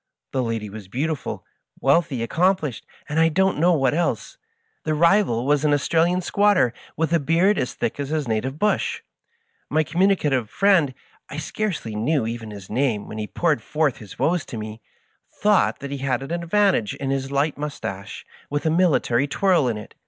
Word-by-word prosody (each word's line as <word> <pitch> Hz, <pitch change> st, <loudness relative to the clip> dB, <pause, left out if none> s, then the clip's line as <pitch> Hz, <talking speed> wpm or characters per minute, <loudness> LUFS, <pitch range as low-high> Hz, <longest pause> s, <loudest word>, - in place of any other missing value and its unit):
The 130 Hz, -, 0 dB
lady 115 Hz, -3 st, -2 dB
was 105 Hz, -1 st, -9 dB
beautiful, 145 Hz, +8 st, -3 dB, 0.3 s
wealthy, 140 Hz, -3 st, +2 dB
accomplished, 165 Hz, -, 0 dB, 0.2 s
and 150 Hz, +2 st, -1 dB
I 165 Hz, 0 st, +5 dB
don't 190 Hz, +1 st, +1 dB
know 175 Hz, +2 st, +4 dB
what 135 Hz, -5 st, +2 dB
else. 170 Hz, +2 st, -1 dB, 0.5 s
The 155 Hz, -1 st, 0 dB
rival 170 Hz, -, +3 dB
was 145 Hz, +1 st, +2 dB
an 150 Hz, -1 st, +4 dB
Australian 165 Hz, +6 st, +2 dB
squatter, 200 Hz, -, +3 dB, 0.2 s
with 160 Hz, +1 st, 0 dB
a 170 Hz, -, +4 dB
beard 170 Hz, +8 st, +2 dB
as 125 Hz, -, -2 dB
thick -, -, -2 dB
as 140 Hz, -1 st, -3 dB
his 155 Hz, -3 st, -1 dB
native 115 Hz, +5 st, -1 dB
bush. 210 Hz, +5 st, 0 dB, 0.7 s
My 155 Hz, +1 st, +2 dB
communicative 155 Hz, -, +1 dB
friend 185 Hz, -10 st, +3 dB, 0.2 s
— -, -, -25 dB
^I 145 Hz, -, -4 dB
scarcely 155 Hz, -, -3 dB
knew 125 Hz, +4 st, +1 dB
even 115 Hz, -1 st, -5 dB
his 100 Hz, -3 st, -9 dB
name 120 Hz, -3 st, 0 dB
when 110 Hz, -, -7 dB
he 105 Hz, -, -3 dB
poured 155 Hz, -4 st, 0 dB
forth 150 Hz, +2 st, 0 dB
his 105 Hz, -3 st, -12 dB
woes 170 Hz, -2 st, +1 dB
to 115 Hz, -, -6 dB
mie 110 Hz, 0 st, -6 dB, 0.3 s
— -, -, -43 dB
thought 210 Hz, -1 st, +3 dB
that 140 Hz, 0 st, -6 dB
he 140 Hz, -, -4 dB
had 135 Hz, -1 st, -1 dB
an 135 Hz, -, -7 dB
advantage 170 Hz, -, +1 dB
in 135 Hz, -1 st, -3 dB
his 135 Hz, 0 st, -2 dB
light 140 Hz, +2 st, +1 dB
mustache, 120 Hz, -10 st, -6 dB, 0.2 s
with 145 Hz, +2 st, -2 dB
a 160 Hz, -, +3 dB
military 150 Hz, -7 st, +2 dB
twirl 175 Hz, -1 st, +2 dB
in 115 Hz, -3 st, -1 dB
it. 105 Hz, -, -10 dB
145 Hz, 185 wpm, -23 LUFS, 120-170 Hz, 0.7 s, I